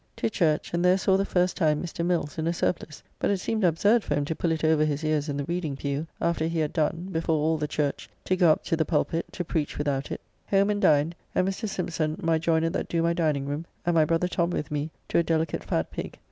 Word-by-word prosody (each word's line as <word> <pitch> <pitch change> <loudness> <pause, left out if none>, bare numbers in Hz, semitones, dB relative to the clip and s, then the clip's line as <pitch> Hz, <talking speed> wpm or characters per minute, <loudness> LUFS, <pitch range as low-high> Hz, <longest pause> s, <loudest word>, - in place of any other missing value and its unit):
To - - -1
church, 160 -6 +1
and 170 0 +1
there 180 +1 +5
saw 190 0 +2
the 195 +1 +2
first 180 -1 +1
time 155 -4 +2
Mr. 170 -1 -4
Mills 170 -3 -1
in 160 - -1
a 170 - +1
surplice; 165 -3 -2 0.2
but - - +1
it 200 - +2
seemed 215 +3 -2
absurd 200 +7 +3
for 145 - -1
him 145 0 0
to 160 - -2
pull 170 - 0
it 160 -1 -2
over 155 -1 +4
his 150 0 -1
ears 155 -1 0
in 140 - -2
the 145 - -1
reading 165 -2 -2
pew, 140 +3 -3
after 170 -1 0
he 165 0 -2
had 155 -2 0
done, 165 +3 -1
before 165 -1 0
all 155 +1 +1
the 150 - -1
church, 145 -1 -2 0.2
to 185 - +2
go 180 -2 +5
up - - +1
to - - 0
the 160 - +2
pulpitt, 165 +1 -1
to 180 - -3
preach 160 -2 -2
without 140 -2 -1
it. - - -5 0.3
Home 200 +1 +3
and 205 0 -1
dined, 150 +2 +4 0.2
and 185 - +2
Mr. 205 +3 -2
Sympson, 165 -4 -2
my 165 -3 +1
joyner 165 0 +1
that - - -2
do 165 -1 +1
my 170 0 +2
diningroom, 150 -2 -1 0.2
and 175 - +2
my 160 -2 +5
brother 165 +3 +1
Tom 170 -1 0
with 150 -4 -3
me 150 +1 -2 0.2
to - - +2
a - - +3
delicate 160 -1 0
fat - - -1
pig. - - -6
165 Hz, 255 wpm, -26 LUFS, 150-175 Hz, 0.3 s, there